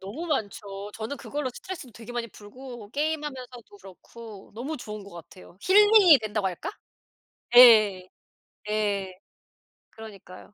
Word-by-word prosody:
너무 215 - -7
많죠. 205 -7 -4
저는 225 +6 -6
그걸로 290 -2 -4
스트레스도 275 0 -9
되게 230 +2 -11
많이 240 -1 -4
풀고 230 +1 -12
게임하면서도 275 -7 -5
그렇고 200 +2 -14
너무 265 +8 -5
좋은 210 -4 -8
것 200 - -14
같아요. 175 +1 -14
힐링이 405 -4 +6
된다고 210 -2 -2
할까? 180 - -6 0.9
예. 215 -7 +7 0.6
예. 200 -3 -2 0.8
그러니까요. 205 -3 -13
220 Hz, 295 characters per minute, -26 LUFS, 200-265 Hz, 0.9 s, 예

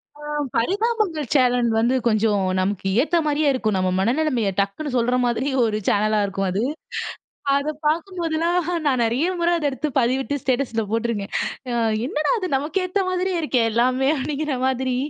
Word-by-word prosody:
ஆ, - - -17 0.4
பரிதாபங்கள் 390 - 0
channel 245 -2 +3
வந்து 240 +3 +2
கொஞ்சம் 215 -3 +2 0.2
நமக்கேத்தா 200 - +1
மாரியே 300 0 +2
இருக்கும். 215 -5 0
நம்ம 185 0 +1
மனநெலமைய 240 -1 +1
டக்குனு 200 +10 -1
சொல்ற 245 +1 +2
மாதிரி 245 +4 0
ஒரு 220 -2 0
சேனலா 215 +1 +2
இருக்கும். 195 0 -2
அது, 195 - -1 1.0
அத 280 +2 -1 0.2
பார்க்கும்போதெல்லாம் 335 +1 0 0.3
நான் 260 -3 +2
நெறைய 245 +9 +1
முற 340 - +2
அத 295 -3 0
எடுத்து 300 +3 -3
பதிவிட்டு 260 +4 0
ஸ்டேட்டஸில 245 -3 0
போட்ருக்கேன். 225 -3 -2 0.7
என்னடா 300 - 0
அது 370 -3 -3
நமக்கேத்த 365 +7 -1
மாதிரியே 365 0 0
இருக்கே, 255 -6 +1
எல்லாமே. 255 +3 +2
அப்படிங்கிற 290 0 -2
மாதிரி 260 -1 0
260 Hz, 140 wpm, -22 LUFS, 230-310 Hz, 1.0 s, channel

